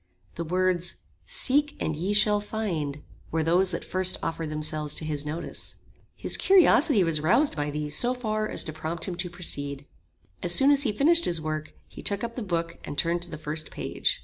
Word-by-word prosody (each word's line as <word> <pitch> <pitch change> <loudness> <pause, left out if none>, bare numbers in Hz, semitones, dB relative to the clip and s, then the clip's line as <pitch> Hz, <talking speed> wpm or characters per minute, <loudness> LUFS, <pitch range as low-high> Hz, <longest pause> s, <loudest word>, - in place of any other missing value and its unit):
The 170 - -4
words 180 0 0 0.3
"Seek 290 +2 +4
and 155 - -2
ye 180 +7 -2
shall 210 0 +3
find," 170 -10 -4 0.3
were 160 0 -1
those 180 +4 +2
that 170 - -4
first 185 0 +2
offered 165 -1 -3
themselves 155 -1 -1
to 155 - -2
his 150 -1 -2
notice. 155 +3 -5 0.4
His - - 0
curiosity 320 - +5
was 165 -3 +1
roused 235 - +2
by 145 -1 -2
these 150 0 -3
so 245 +1 +2
far 215 -3 -2
as - - +4
to 155 - -6
prompt 160 +2 -4
him 185 - -3
to 180 0 -3
proceed. 145 -5 -3 0.6
As 175 0 +3
soon 275 +1 +6
as 285 -1 +5
he 255 -6 +2
finished 330 +10 +3
his 170 -2 0
work, 155 0 -5
he - - -11
took 200 +1 -1
up 235 0 -4
the 250 - -4
book 170 -5 -3
and 145 - -7
turned 170 +1 0
to 175 - -4
the 155 - -7
first 155 +1 -1
page. - - -2
175 Hz, 200 wpm, -26 LUFS, 155-210 Hz, 0.6 s, soon